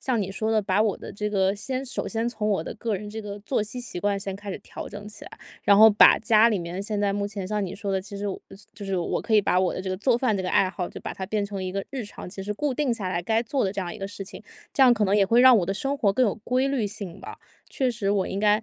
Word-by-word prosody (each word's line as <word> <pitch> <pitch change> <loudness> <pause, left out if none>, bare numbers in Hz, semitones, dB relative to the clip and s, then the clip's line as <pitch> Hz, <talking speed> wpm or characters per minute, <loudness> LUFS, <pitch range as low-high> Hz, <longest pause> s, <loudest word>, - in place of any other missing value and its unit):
像 245 -5 0
你 195 - -3
说 215 +3 -1
的， 220 - +3
把 195 +1 +2
我 215 -3 +1
的 - - -8
这 210 +1 -3
个 195 -1 +2
先 255 +5 -4
首 265 - -4
先 225 +1 -1
从 215 -3 -3
我 195 -6 +1
的 - - -6
个 225 -1 -2
人 205 +2 -5
这 220 +1 -6
个 205 0 -6
作 215 +1 -1
息 230 +4 -6
习 240 -7 -6
惯， 200 +1 0
先 195 -1 -4
开 205 0 -7
始 - - -5
调 - - -9
整 205 0 -8
起 210 - -7
来。 - - -11 0.3
然 200 - +5
后 220 +1 +10
把 210 -1 +7
家 220 +1 +5
里 210 - +1
面 175 +2 -5
现 210 0 -2
在 205 -1 +2
目 200 0 -1
前 200 -2 -5
像 210 -1 -1
你 180 - -5
说 200 -1 -4
的， 190 -1 0
其 200 +1 -9
实 200 +1 -3
我 195 - -4 0.4
就 205 - -7
是 195 -2 -1
我 170 - -1
可 225 -1 0
以 210 - +7
把 185 -2 +2
我 185 -1 +2
的 - - -4
这 190 - -5
个 185 - -2
做 235 +4 +2
饭 235 -5 +1
这 190 - -2
个 185 - -2
爱 190 - +3
好， 180 -1 -4
就 - - -9
把 - - -6
它 190 - -5
变 210 +2 -1
成 200 -2 -5
一 185 - -4
个 195 - -2
日 265 -4 -5
常 205 - -9
其 195 +1 -7
实 205 +2 -3
固 275 +5 -2
定 280 -3 0
下 205 -5 -3
来 175 -1 -2
该 225 +4 +1
做 255 +2 -1
的 190 - -1
这 200 - -3
样 175 -2 -4
一 - - -7
个 195 - -5
事 200 0 -7
情， 195 +1 -9 0.3
这 275 - +4
样 255 -2 +8
可 215 -3 +1
能 195 +2 +3
也 200 - +5
会 230 +5 +4
让 255 -1 +8
我 195 - +2
的 195 - -1
生 275 +7 -2
活 200 -6 +2
更 255 +4 +3
有 205 - 0
规 255 +2 +1
律 260 -6 0
性 200 -4 -7
吧。 - - -9 0.3
确 260 -2 0
实， 210 -4 -1
我 195 -2 +1
应 195 - -3
该 210 +1 +3
205 Hz, 350 characters per minute, -25 LUFS, 195-225 Hz, 0.4 s, 后